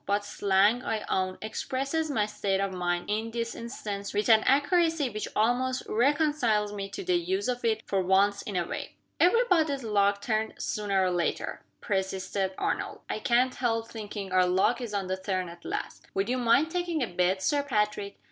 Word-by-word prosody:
But 205 +1 +1
slang, 205 +4 +2
I 220 -3 -2
own, 185 0 0
expresses 275 +8 -2
my 220 -7 +1
state 200 -2 -1
of 195 -1 -1
mind, 175 -1 -1
in 220 +2 -1
this 230 0 -3
instance, 205 -4 -6
with 210 +3 +1
an 220 -1 +7
accuracy 300 0 +3
which 215 0 -4
almost 250 +4 +1
reconciles 245 -5 +2
me 195 -1 -5
to 295 - -6
the 365 -1 +2
use 375 +3 -1
of 245 -1 -2
it 220 -1 +1
for 195 -1 0
once 195 +2 +3
in 205 - -6
a 175 -1 +1
way." - - -6 0.2
"Every 460 +8 +5
body's 310 - +2
luck 200 -2 +2
turns 220 +1 -2
sooner 200 -2 0
or 185 - +1
later," 175 -1 -2 0.2
persisted 190 -1 -2
Arnold. - - -2
"I - - -2
can't 250 +3 +2
help 230 -2 -1
thinking 205 -3 -6
our 185 -1 +4
luck 190 +8 +2
is 225 -4 -4
on 195 -1 -1
the 185 +1 -2
turn 190 -1 -2
at 170 0 -12
last. - - -5
Would 195 +3 0
you 255 +1 0
mind 250 +7 +3
taking 350 -4 -1
a - - -1
bet, 180 +1 0
Sir 290 +7 +2
Patrick?" 210 -6 -1
215 Hz, 190 wpm, -28 LUFS, 195-255 Hz, 0.2 s, an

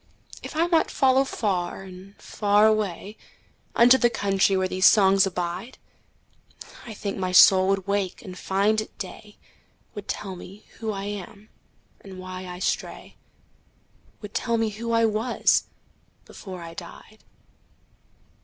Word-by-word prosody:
If - - -9
I 325 +2 +2
might 335 -2 +2
follow 265 -1 +3
far 195 -8 -3
and 190 +1 -13
far 205 0 +2
awayUnto 215 +4 0
the 240 - +5
country 195 -3 +1
where 185 0 0
these 185 0 +4
songs 195 -2 +5
abide,I 185 +4 -9
think 200 -1 -5
my 185 -1 -2
soul 185 +1 +7
would 195 -1 0
wake 200 -2 -2
and 185 -4 -9
find 200 +4 +1
it 215 - -11
day, 210 +2 -9 0.6
Would 205 -2 -8
tell 195 -3 -5
me 195 +3 -12
who 220 -1 -3
I 195 -1 -5
am, 205 +1 -8 0.5
and 190 -2 -12
why 185 0 -8
I 180 0 -7
stray,—Would 205 +2 -8
tell 235 -1 0
me 225 -1 0
who 230 +3 -5
I 230 0 +3
was 220 +3 +1 0.6
before 185 -3 -10
I 165 0 -9
died. 180 +5 -12
200 Hz, 135 wpm, -24 LUFS, 185-220 Hz, 0.6 s, soul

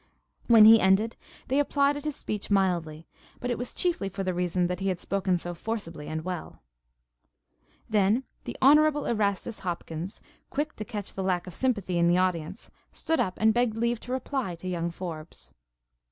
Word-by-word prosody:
When 225 -3 +8
he 225 0 +9
ended 195 +5 +3 0.3
they 270 +3 +2
applauded 285 0 +1
his 300 -2 -2
speech 210 -1 -5
mildly; 170 -5 0 0.3
but 245 - -2
it 240 - -1
was 245 - -4
chiefly 345 - 0
for 195 0 -4
the 185 -1 -1
reason 180 0 0
that 180 0 -2
he 195 - -2
had 185 -2 -1
spoken 190 -2 0
so 175 +1 -5
forcibly 170 -6 -5
and 160 +1 -4
well. 180 - -6 1.2
Then 215 +3 +2 0.2
the - - -6
Honorable 295 +1 +5
Erastus 210 0 -1
Hopkins, 175 0 -5 0.3
quick 295 +2 -2
to 215 - -5
catch 210 -4 -6
the 195 - -4
lack 180 -2 0
of 180 - -9
sympathy 205 -7 0
in 170 - +4
the 175 +1 +4
audience, 185 +1 -2 0.2
stood 325 -1 -1
up 185 -1 0
and 220 0 +4
begged 240 -2 +1
leave 235 0 0
to 250 - -8
reply 260 -6 -2
to 170 +2 -9
young 170 -2 -1
Forbes. 160 - -8
195 Hz, 180 wpm, -27 LUFS, 175-235 Hz, 1.2 s, he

